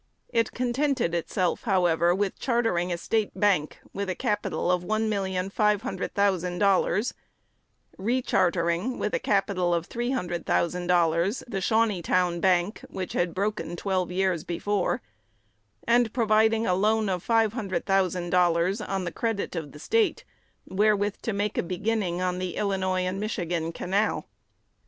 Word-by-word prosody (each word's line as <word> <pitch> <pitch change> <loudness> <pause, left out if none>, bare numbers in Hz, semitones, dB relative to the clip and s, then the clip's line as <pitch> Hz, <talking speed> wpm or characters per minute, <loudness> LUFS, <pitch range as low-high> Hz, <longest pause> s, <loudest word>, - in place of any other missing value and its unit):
It 230 -1 +1
contented 250 - 0
itself, 175 +1 -1
however, 175 -4 +3
with 200 0 -2
chartering 225 -8 0
a 170 - -1
State 215 +4 -1
bank, 195 -8 +2 0.2
with 200 0 -3
a 185 - -1
capital 205 -5 -1
of 180 -1 +1
one 215 +3 0
million 190 -2 -2
five 210 0 +2
hundred 260 - -4
thousand 185 -3 +1
dollars; 200 +2 +2 0.9
rechartering, 190 -2 +1
with 210 - -2
a - - +1
capital 190 -3 +1
of 170 0 -2
three 240 +5 -3
hundred 175 -10 -3
thousand 175 +1 0
dollars, 175 +4 +2
the 195 -5 -3
Shawneetown 185 -5 +1
Bank, 185 +1 +2
which 185 -1 -5
had 175 -1 0
broken 205 -2 -2
twelve 185 -1 -1
years 185 -3 0
before; 205 +4 -1 0.8
and 235 -1 +3
providing 220 -1 +3
for - - 0
a - - +3
loan 215 +3 +2
of 185 -2 -1
five 225 -1 +2
hundred 195 -7 -3
thousand 185 -3 +1
dollars, 180 +3 +2
on 195 -2 -2
the 170 - -3
credit 225 -3 -2
of 155 -4 -4
the - - -12
State, 440 - +1 0.4
wherewith 205 +1 +1
to 225 - -2
make 205 0 -1
a - - +3
beginning 185 0 -1
on 180 0 -1
the 185 -2 -3
Illinois 190 -2 0
and 185 +1 -2
Michigan 175 -6 -2
Canal. 195 +5 -1
190 Hz, 155 wpm, -26 LUFS, 175-215 Hz, 0.9 s, however